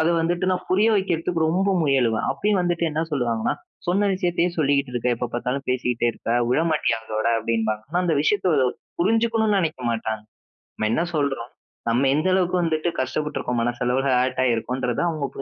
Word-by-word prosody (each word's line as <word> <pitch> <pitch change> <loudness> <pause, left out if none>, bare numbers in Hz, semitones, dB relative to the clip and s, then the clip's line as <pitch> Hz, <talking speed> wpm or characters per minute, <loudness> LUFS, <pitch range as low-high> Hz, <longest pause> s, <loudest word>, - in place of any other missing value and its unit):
அத 160 - +3
வந்துட்டு 175 +2 0
நான் 185 0 -2
புரிய 205 +4 +4
வைக்கிறதுக்கு 170 -3 -1
ரொம்ப 190 +4 +1
முயலுவேன். 125 -6 +2
அப்பயும் 205 -2 +1
வந்துட்டு 175 -1 0
என்ன 155 +1 -1
சொல்லுவாங்கன்னா, 120 -5 0 0.3
சொன்ன 200 +4 +2
விஷயத்தையே 175 -2 +1
சொல்லிகிட்டு 140 -3 +1
இருக்க, 120 0 -1
எப்ப 125 - -2
பாத்தாலும் 125 +3 -2
பேசிக்ட்டே 125 -2 0
இருக்க, - - -6 0.2
விடமாட்டியா 150 -4 +1
அதோட 110 0 -2
அப்டின்பாங்க. 110 -2 -1
ஆனா 175 +2 +1
அந்த 170 -3 +2
விஷயத்த 185 +1 +2 0.5
புரிஞ்சுக்கணும்னு 225 +1 +2
நெனைக்க 160 -7 -1
மாட்டாங்க. 110 -1 -3 0.5
நம்ம 110 - -1
என்ன 165 - +1
சொல்றோம், 135 -5 -1 0.4
நம்ம 125 +4 +2
எந்த 155 +5 +1
அளவுக்கு 185 -1 +1
வந்துட்டு 160 +1 0
கஷ்டப்பட்ருக்கோம், 130 -2 -2
மனசளவுல 125 +3 0
ஹர்ட் 130 +1 +1
ஆகியிருக்கோம்ன்றத 125 +1 -1
அவங்க 155 -4 -2
பு - - -5
145 Hz, 160 wpm, -23 LUFS, 125-175 Hz, 0.5 s, புரிய